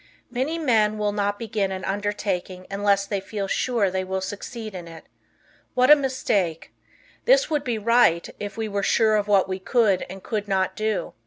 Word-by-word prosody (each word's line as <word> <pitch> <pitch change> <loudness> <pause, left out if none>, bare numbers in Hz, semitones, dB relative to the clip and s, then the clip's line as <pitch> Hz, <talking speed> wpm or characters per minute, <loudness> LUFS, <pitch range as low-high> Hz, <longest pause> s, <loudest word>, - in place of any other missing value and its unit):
Many 265 +7 -1
men 220 -8 +2
will 210 -1 0
not 205 0 -1
begin 215 -3 -2
an 190 0 -4
undertaking 195 -2 -3
unless 200 0 +2
they 200 -1 -2
feel 200 0 -4
sure 220 -3 +1
they 190 0 -1
will 190 0 -2
succeed 215 +3 -6
in 175 -2 -7
it. 165 -1 -12 0.7
What 255 +3 +5
a - - +12
mistake! 230 - -1 0.5
This - - +4
would 295 -2 +1
be 240 -4 -1
right, 220 -6 +3
if 205 +1 -6
we 220 -1 -2
were 200 -1 -2
sure 220 +2 +3
of 210 -1 0
what 200 -2 +4
we 190 0 -3
could 200 -2 +2
and 190 +1 -9
could 210 -2 -3
not 190 -1 0
do. 215 -1 -2
205 Hz, 185 wpm, -24 LUFS, 190-225 Hz, 0.7 s, a